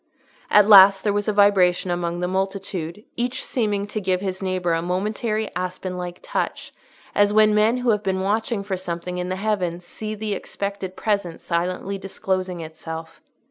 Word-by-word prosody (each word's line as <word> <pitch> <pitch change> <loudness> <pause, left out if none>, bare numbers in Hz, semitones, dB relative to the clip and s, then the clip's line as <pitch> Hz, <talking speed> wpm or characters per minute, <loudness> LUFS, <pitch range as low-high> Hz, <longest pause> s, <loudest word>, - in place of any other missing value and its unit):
At 210 -1 +6
last 195 -2 +8
there 205 - +1
was 205 +1 -1
a - - +3
vibration 195 -3 +4
among 175 0 -2
the 180 - 0
multitude, 190 -1 -3
each 245 +2 -2
seeming 210 -5 -1
to 210 +1 -4
give 185 -1 +1
his 190 -1 -4
neighbour 185 -2 0
a 165 - +1
momentary 215 +5 -1
aspen 185 0 -4
like 180 -1 -5
touch, - - -3 0.4
as 205 0 +4
when 215 0 +5
men 215 +3 +3
who 245 -1 +2
have 210 -1 +1
been 190 -2 -1
watching 210 +2 0
for 195 -1 -2
something 180 0 -4
in 180 0 -3
the 185 - -1
heavens 185 -4 -2
see 215 +4 -6
the 210 0 -3
expected 200 -1 -5
presence 200 -6 -2
silently 180 +3 -2
disclosing 185 -2 -3
itself. 160 0 -8
190 Hz, 175 wpm, -23 LUFS, 180-210 Hz, 0.4 s, last